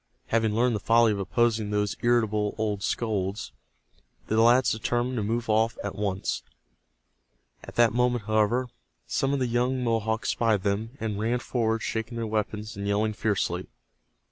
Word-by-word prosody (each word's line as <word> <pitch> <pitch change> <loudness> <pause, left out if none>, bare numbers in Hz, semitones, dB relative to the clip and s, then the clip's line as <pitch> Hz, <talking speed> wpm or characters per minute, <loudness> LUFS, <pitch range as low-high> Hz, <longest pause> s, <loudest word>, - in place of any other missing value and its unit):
Having 110 -2 +1
learned 120 0 +2
the - - -1
folly 115 +2 +4
of 100 - -2
opposing 110 +1 +1
those 105 -1 0
irritable 110 -3 +1
old 105 -2 -1
scolds, 100 - -2 0.7
the 110 +1 +2
lads 120 +2 +5
determined 120 +3 -1
to - - 0
move 115 +2 -1
off 110 +1 +2
at 100 - -3
once. 100 -2 -2 1.2
At - - -11
that 120 -1 +4
moment, 125 -1 +1
however, 110 +4 +1 0.4
some 135 - 0
of 140 - +1
the 130 - 0
young 125 +2 0
Mohawks 115 -1 0
spied 110 -5 +1
them, 110 +5 -2
and 105 -2 -3
ran 115 +3 +1
forward 115 -2 -1
shaking 110 +1 -3
their 115 - -2
weapons, 105 0 -3
and 100 0 -4
yelling 105 +2 +1
fiercely. 105 -3 -1
110 Hz, 160 wpm, -27 LUFS, 105-120 Hz, 1.2 s, lads